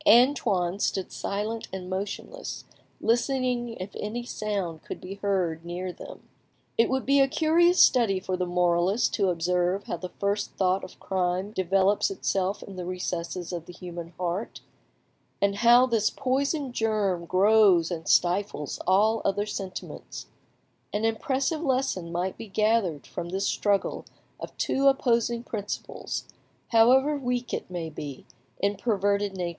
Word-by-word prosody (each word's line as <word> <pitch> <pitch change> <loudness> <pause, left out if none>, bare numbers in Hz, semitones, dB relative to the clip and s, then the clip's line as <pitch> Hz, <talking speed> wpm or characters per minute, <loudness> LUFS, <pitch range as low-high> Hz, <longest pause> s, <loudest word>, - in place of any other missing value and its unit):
Antoine 210 -7 +4
stood 190 -2 -1
silent 215 +3 -3
and 185 -1 -6
motionless, 200 - -5 0.3
listening 240 0 0
if 185 +2 -7
any 230 +3 -4
sound 200 -8 -3
could - - -7
be 185 +1 -7
heard 180 -5 0
near 180 +1 -4
them. - - -11 0.5
It 230 - +3
would 265 0 0
be 280 +1 +4
a 270 - +5
curious 340 +5 +3
study 230 -7 +5
for 185 0 -2
the 180 0 -2
moralist 175 +4 +2
to 195 -3 +2
observe 180 +2 0
how - - -4
the 180 - -6
first 200 +2 -2
thought 190 0 +1
of 185 - -10
crime 185 +1 -1
develops 195 - +2
itself 195 - -1
in 195 -2 -10
the 180 - -4
recesses 180 -1 -4
of 170 -1 -5
the 180 - -9
human 175 -1 -7
heart, 180 +4 -3 0.8
and 200 0 +1
how 240 +3 +6
this 225 -4 +2
poisoned 275 +1 -1
germ 210 -6 0
grows 190 -3 +5
and 165 -2 -5
stifles 180 -4 +1
all 215 +4 +4
other 205 +1 0
sentiments; 195 -3 -6 0.7
an 210 +2 -1
impressive 265 +7 0
lesson 255 - 0
might 180 +2 -2
be 225 - -7
gathered 210 -6 +1
from 170 - -6
this 190 +2 -1
struggle 200 -1 0 0.3
of - - -8
two 275 +1 +1
opposing 235 -3 +2
principles, 210 -4 -4 0.5
however 260 +6 +5
weak 245 -3 -2
it - - -3
may 175 -3 -4
be, 145 -3 -7 0.3
in 200 +1 0
perverted 200 -2 0
natures. 175 -1 -1
200 Hz, 145 wpm, -27 LUFS, 180-235 Hz, 0.8 s, how